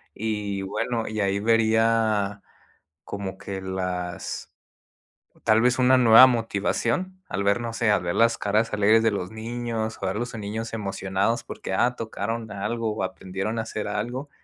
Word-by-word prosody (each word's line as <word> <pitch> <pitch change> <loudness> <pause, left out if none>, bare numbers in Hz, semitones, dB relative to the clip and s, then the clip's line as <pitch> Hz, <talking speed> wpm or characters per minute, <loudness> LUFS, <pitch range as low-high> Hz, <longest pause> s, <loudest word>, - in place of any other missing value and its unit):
y 105 -2 -2
bueno, 110 +4 -2
y 110 0 -4
ahí 100 0 +1
vería 110 -2 +2 0.6
como 100 -1 -5
que 95 0 -6
las 90 -2 -4 0.9
tal 110 +1 +4
vez 125 +1 +3
una 130 0 +5
nueva 120 +1 +9
motivación 120 - -1
al 100 +2 -2
ver, 100 +4 +2
no 115 -1 -4
sé, 115 -2 +1
al 105 - +2
ver 85 - -1
las 115 0 +3
caras 110 +3 +1
alegres 105 +2 +4
de 115 - +4
los 90 -2 -3
niños, 115 0 -4
o - - 0
a 95 - -1
los 120 +3 -4
niños 110 +2 -5
emocionados 100 +2 -1
porque - - -5
ah, 120 +5 +2
tocaron 115 0 -4
algo, 110 +1 -2
aprendieron 95 +3 -4
a - - 0
hacer 110 -1 -5
algo, 125 +7 -3
110 Hz, 160 wpm, -25 LUFS, 100-115 Hz, 0.9 s, nueva